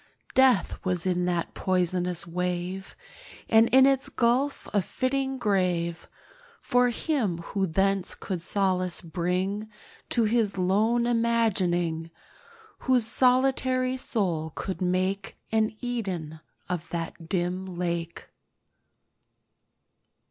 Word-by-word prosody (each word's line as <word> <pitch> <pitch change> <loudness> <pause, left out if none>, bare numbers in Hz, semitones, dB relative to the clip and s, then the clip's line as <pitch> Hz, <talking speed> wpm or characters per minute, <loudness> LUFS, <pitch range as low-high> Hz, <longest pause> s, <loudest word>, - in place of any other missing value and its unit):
Death 260 -8 +3
was 180 -2 -1
in 180 -1 +1
that 175 -2 -1
poisonous 180 -2 0
wave, 180 +2 -3 0.5
And 225 +1 +5
in 265 +1 +7
its 270 -1 +2
gulf 255 +4 +1
a 205 - +3
fitting 265 +5 -1
grave 180 -6 0 0.5
For 245 0 +2
him 240 - -1
who 190 +3 -2
thence 195 +2 +1
could 185 -4 -4
solace 185 -2 0
bring 185 +5 -2 0.4
To 235 - +2
his 220 -2 +1
lone 215 +6 +2
imagining— 190 -9 +1 0.7
Whose 255 -3 +2
solitary 255 +1 +2
soul 175 -11 -1
could 190 0 -4
make 185 +2 -1
An 220 0 +1
Eden 190 -11 -4 0.3
of 175 -2 -4
that 165 -1 -5
dim 185 +1 -1
lake. 170 -2 -4
190 Hz, 105 wpm, -27 LUFS, 175-235 Hz, 0.7 s, in